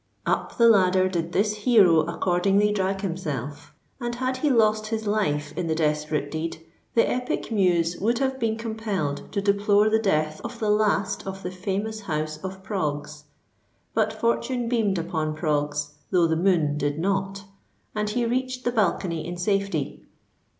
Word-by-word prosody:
Up - - -1
the 235 - +6
ladder 185 -4 +5
did 170 -2 -2
this 210 +3 +1
hero 205 -7 +5
accordingly 185 +5 +2
drag 195 -1 -1
himself; 150 - -4 0.3
and 240 -1 -3
had 255 +1 -1
he 295 +3 +1
lost 215 -3 +3
his 220 0 -3
life 150 -8 0
in 175 - -2
the 160 - 0
desperate 150 -2 0
deed, 160 +1 -3 0.4
the 230 - +4
epic 250 -1 -2
muse 175 -5 +2
would 230 +4 +1
have 265 0 -1
been 225 -2 0
compelled 215 -10 -3
to 200 - -1
deplore 205 +1 +3
the 220 - +4
death 155 -7 0
of 235 0 -6
the 215 -2 +1
last 210 -2 +1
of 195 0 -6
the 180 - -4
famous 200 +4 -3
house 155 -5 -3
of 190 0 -6
Proggs. 150 -6 -3 0.7
But - - +2
fortune 235 +1 -1
beamed 220 -5 +1
upon 160 -3 -2
Proggs, 150 -2 -1 0.2
though 175 -2 +4
the 160 0 +1
moon 160 -4 +2
did 145 0 -1
not; 195 +2 -1 0.5
and 210 -1 -1
he 240 +2 0
reached 255 +1 -2
the 245 - +1
balcony 180 -7 0
in 175 0 -5
safety. 195 -5 -1
195 Hz, 165 wpm, -25 LUFS, 160-220 Hz, 0.7 s, the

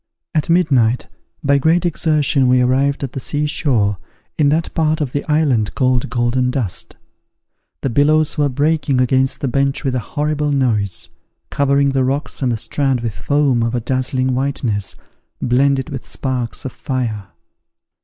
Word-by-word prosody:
At 155 -1 0
midnight, 135 -9 +2 0.4
by 140 -1 +3
great 165 +5 +2
exertion, 150 -5 +2
we 125 0 +4
arrived 135 +3 +1
at 135 - -3
the - - -4
sea 145 +3 -2
shore, 115 - +1 0.4
in 145 -2 +3
that 160 +3 0
part 155 0 +1
of 145 -5 -2
the 145 - -2
island 135 -9 +1
called 130 -3 +1
Golden 120 +1 0
Dust. 125 -8 -3 0.9
The 135 - -1
billows 150 +4 +3
were 145 -2 +1
breaking 145 0 +1
against 130 +1 +1
the 140 - 0
bench 135 +2 0
with 135 - -1
a 130 - 0
horrible 150 +4 -2
noise, 115 -8 0 0.4
covering 140 0 +2
the 135 -1 +1
rocks 140 +4 -2
and 130 -2 +1
the 115 - -1
strand 135 +2 0
with 115 -3 -3
foam 140 -3 +1
of 115 +1 0
a - - +1
dazzling 130 +1 -1
whiteness, 125 -7 -2 0.4
blended 135 +3 +1
with 135 -3 -6
sparks 125 -3 -3
of 135 - -3
fire. 120 - -3
135 Hz, 160 wpm, -18 LUFS, 125-145 Hz, 0.9 s, we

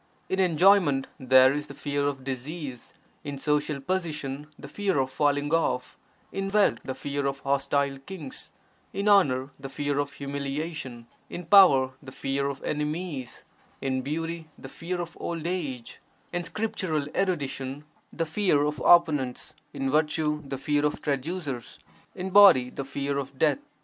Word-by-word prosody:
In 190 - 0
enjoyment, 175 -5 +4
there 130 +1 +6
is 150 +1 -3
the - - -10
fear 145 -1 -1
of 135 -2 -3
disease; 135 0 -6 0.3
in 145 -2 -5
social 150 +1 0
position, 150 -4 -3
the - - -10
fear 195 +2 -1
of 130 -1 0
falling 145 +1 +1
off; 130 -6 0 0.4
in 195 0 -3
wealth, 205 0 +3
the 130 - -4
fear 140 0 -2
of 140 0 -3
(hostile) 140 0 0
kings; 150 -2 -9 0.4
in 200 +1 -2
honour, 145 -10 +4
the 135 0 -7
fear 145 +1 -1
of 145 0 -2
humiliation; 140 -2 -5 0.2
in 175 - -6
power, 150 -8 +7
the 135 -2 -10
fear 140 +1 -2
of 140 -1 -5
enemies; 150 -3 -3 0.4
in 130 -1 -1
beauty, 165 +3 -4
the 135 - -10
fear 175 +5 -5
of 170 -1 -5
old 165 -2 -4
age; 150 -10 -4 0.3
in 175 0 -1
scriptural 180 -7 -2
erudition, 145 -6 -2 0.3
the 165 - -2
fear 160 -3 +2
of 150 -2 -2
opponents; 150 -7 +3 0.2
in 135 0 -2
virtue, 150 0 +1
the 135 - -4
fear 145 +2 0
of 150 - 0
traducers; 145 -3 -3 0.4
in 185 +1 -4
body, 185 -11 +7
the 140 - -5
fear 140 +1 -2
of 135 0 -7
death. 155 - +3
145 Hz, 155 wpm, -27 LUFS, 135-170 Hz, 0.4 s, power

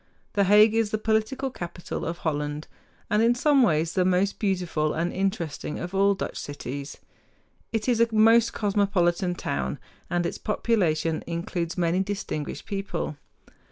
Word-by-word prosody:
The 200 -1 +3
Hague 210 +3 +6
is 225 -1 +2
the 215 - 0
political 220 +5 0
capital 175 -5 -6
of 170 +1 -3
Holland, 150 0 -2 0.5
and 210 +1 +3
in 235 +1 +4
some 280 +2 +4
ways 165 -7 +2
the 185 - +2
most 185 +2 +1
beautiful 180 -6 0
and 170 +2 -1
interesting 175 -6 -2
of 175 +2 -6
all 200 +1 +3
Dutch 190 - -5
cities. 140 0 -6 0.7
It 225 0 -2
is 240 -2 +3
a 230 - +5
most 225 +1 +5
cosmopolitan 195 -3 +1
town, 65 - -2 0.3
and 175 0 0
its - - -3
population 165 -8 0
includes 170 0 -3
many 175 +1 +1
distinguished 190 -6 -3
people. 195 -6 -3
190 Hz, 150 wpm, -26 LUFS, 165-215 Hz, 0.7 s, Hague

